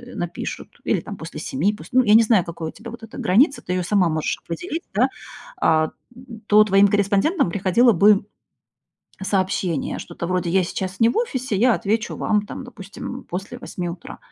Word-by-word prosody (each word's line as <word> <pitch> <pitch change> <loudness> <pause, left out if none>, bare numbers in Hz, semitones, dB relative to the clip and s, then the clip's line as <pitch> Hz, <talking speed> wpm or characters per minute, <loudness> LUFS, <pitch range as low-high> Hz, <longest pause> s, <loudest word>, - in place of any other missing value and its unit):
напишут, - - -6
или - - +1
там - - -8
после - - -8
7 215 -6 0
пусть, 230 - -12
ну 255 0 +5
я 210 - +4
не 230 - +7
знаю, 215 -5 +3
какой 165 -1 -5
у - - -8
тебя 230 +2 -10
вот 235 -1 -11
эта 225 - -10
граница, 270 - +3
ты 180 - -4
ее 180 -1 0
сама 185 -2 +2
можешь 155 -1 -2
определить, 330 - -5
да. 240 +6 +3 0.5
А, 155 0 +2 0.6
то 210 0 +7
твоим 200 -1 +5
корреспондентам 200 - +2
приходило 200 +7 +3
бы 200 +3 +5 1.1
cообщение. 185 -5 -1
Что-то 170 -1 -6
вроде: 180 -1 -1
"Я 190 +1 +3
сейчас 185 +1 -5
не 230 - +6
в - - -5
офисе, 260 - -1
я 245 +5 +4
отвечу 215 +2 -1
вам 210 -1 +1
там, 260 - -7
допустим, 245 +2 -8
после 195 +7 -6
8 180 -7 -5
утра". 170 0 -8
200 Hz, 185 wpm, -22 LUFS, 180-235 Hz, 1.1 s, не